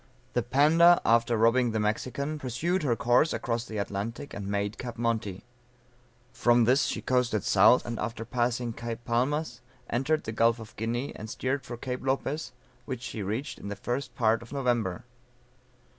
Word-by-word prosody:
The 120 - +2
Panda 155 +8 +5
after 115 0 +3
robbing 115 +1 +3
the 110 - 0
Mexican, 130 +8 -2
pursued 150 +9 -1
her 130 -6 +1
course 125 +7 +3
across 115 -1 -2
the 110 - -6
Atlantic, 105 +7 -4
and 100 -1 -5
made 100 +1 -2
Cape 120 -2 -6
Monte; 115 -5 -2 0.9
from 120 0 +4
this 130 +5 +4
she - - -3
coasted 125 -5 +1
south, 105 +5 +5
and 120 -1 -4
after 115 +1 -4
passing 120 -1 -1
Cape 115 0 -6
Palmas 125 +2 -1 0.3
entered 150 +6 +1
the 110 - -4
Gulf 115 +1 +3
of 110 -2 -11
Guinea, 120 +5 -3
and 110 - -8
steered 130 +4 -2
for 120 - -8
Cape 125 +1 -4
Lopez 135 +3 -1 0.3
which 130 -3 -5
she 110 - -5
reached 110 +9 -3
in - - -8
the 100 - -4
first 125 +5 -4
part 115 -1 +2
of 115 - -13
November. 120 -7 -1
120 Hz, 170 wpm, -28 LUFS, 115-130 Hz, 0.9 s, Panda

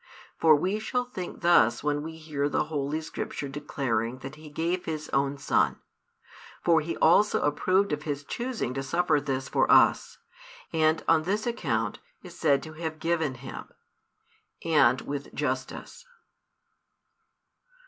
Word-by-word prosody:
For 160 -1 +6
we 190 +8 0
shall 250 +3 -1
think 185 -8 -7
thus 120 -9 +4
when 145 0 0
we 160 +1 -7
hear 150 -3 -2
the - - +1
Holy 150 0 -2
Scripture 145 -2 -5
declaring 130 -5 -2
that 135 - -6
He 155 0 -12
gave 170 +4 -2
His 155 -1 -4
own 140 +1 0
Son. 140 - +1 0.9
For 165 -2 +4
He 165 +2 -4
also 205 +6 +4
approved 185 +6 +2
of 150 - -2
His 145 -2 -4
choosing 235 - -3
to 135 - -3
suffer 150 +2 +1
this 135 -2 -3
for - - +2
us; - - +4 0.6
and, 160 0 +2
on 165 -1 +5
this 200 +6 -1
account, 115 - -1 0.2
is 175 -2 -11
said 140 -4 +2
to 155 - -9
have 160 0 -5
given 160 -4 -1
Him: 130 +2 -9 1.0
and 155 -5 +4
with 140 0 -5
justice. 485 - -4
155 Hz, 145 wpm, -27 LUFS, 140-170 Hz, 1.0 s, For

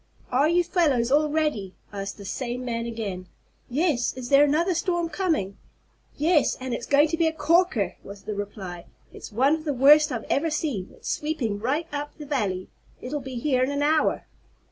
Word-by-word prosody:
"Are 275 +5 +3
you 350 +1 +3
fellows 295 -9 +1
all 300 +2 +4
ready?" 295 -12 -1 0.2
asked 200 0 -5
this 200 -1 -6
same 250 -1 -4
man 230 -1 -2
again. 200 -6 -5 0.4
"Yes. 280 -2 +1
Is 255 -2 -7
there 280 0 +7
another 320 +6 +2
storm 345 0 -1
coming?" 315 - -1 0.6
"Yes, 310 0 +2
and 260 -1 -4
it's 235 - -4
going 285 +2 +5
to 330 - -1
be 330 -1 +3
a - - +2
corker!" 320 - +1
was 200 0 -11
the 215 - -4
reply. 195 -4 -6 0.3
"It's - - -10
one 260 +7 +3
of 320 -1 -2
the 295 -3 -2
worst 295 +4 +6
I've 235 -3 -3
ever 325 +4 +1
seen. 280 - -2
It's - - -12
sweeping 260 -10 -2
right 275 +9 -1
up 290 0 -5
the 300 - -8
valley. 205 -10 -2 0.3
It'll 285 +3 -4
be 260 -1 -7
here 255 +1 +1
in 255 - +2
an 285 0 -1
hour." 310 +1 +2
275 Hz, 190 wpm, -25 LUFS, 230-310 Hz, 0.6 s, there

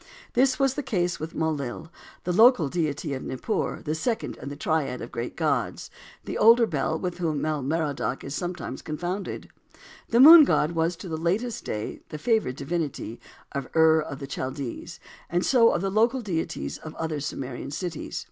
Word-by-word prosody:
This 255 +1 +3
was 270 -2 +2
the 290 - -3
case 180 -9 -1
with 155 +1 -6
Mul 160 0 +1
lil, 145 +3 -6 0.3
the 180 - -1
local 220 - +6
deity 150 -2 -2
of 130 - -4
Nippur, 130 - -3
the 155 - -1
second 220 +9 -2
in 140 - -7
the 145 - -6
triad 145 -5 -1
of 115 - -7
great 120 +1 -5
gods, 145 -6 -1 0.3
the - - -4
older 230 +2 +7
Bel, 155 -3 -1
with 180 +1 -4
whom 160 -4 -1
Bel 155 -2 -1
Merodach 145 -2 -2
is 140 - -6
sometimes 175 +1 -4
confounded. 175 +6 -4 0.6
The 235 - +3
Moon 315 +4 +11
God 155 - +2
was 165 +1 0
to 185 +2 -9
the 160 -2 -3
latest 200 +9 -1
day 105 0 -4
the 155 - -6
favored 215 - +1
divinity 140 -6 -4 0.3
of 140 -2 -4
Ur 160 0 +5
of 140 -3 -6
the 140 - -6
Chaldees, 130 -1 -5 0.3
and 175 +1 0
so 235 -3 +5
of 175 - -1
the 195 - 0
local 230 +5 +2
deities 170 -6 -3
of 155 - -9
other 160 -2 -3
Sumerian 135 -3 -5
cities. 165 +2 -4
160 Hz, 185 wpm, -26 LUFS, 140-195 Hz, 0.6 s, Moon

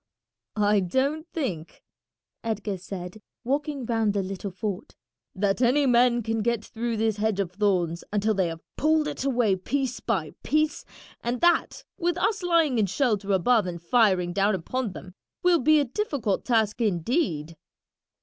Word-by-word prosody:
"I 210 -1 +3
don't 275 - 0
think," 185 - -4 0.6
Edgar 210 -3 -3
said, 185 +2 -7 0.2
walking 280 +1 -2
round 225 -3 0
the 200 - +1
little 195 +1 -5
fort, 195 +2 -5 0.4
"that 195 +3 0
any 265 +4 +4
men 240 -1 +4
can 225 0 -1
get 235 -1 -1
through 235 -1 -3
this 220 -1 0
hedge 210 -1 0
of 190 -3 -1
thorns 180 -4 0
until 210 +1 +1
they 190 -3 +1
have 165 0 -7
pulled 310 +1 +2
it - - -4
away 245 -7 +2
piece 255 +6 -2
by 185 -10 -2
piece, 305 +2 0 0.4
and 240 +1 -1
that, 345 -1 +2 0.2
with 345 0 0
us 405 +3 0
lying 330 -8 +2
in 205 - +2
shelter 205 -2 0
above 205 +2 +3
and 170 -1 -5
firing 180 -2 +2
down 200 +2 +2
upon 220 +4 -3
them, 185 -1 -10 0.3
will 355 -2 +4
be 310 +4 +5
a 285 - +2
difficult 260 - -2
task 225 -2 +1
indeed." 175 - 0
220 Hz, 160 wpm, -26 LUFS, 195-265 Hz, 0.6 s, be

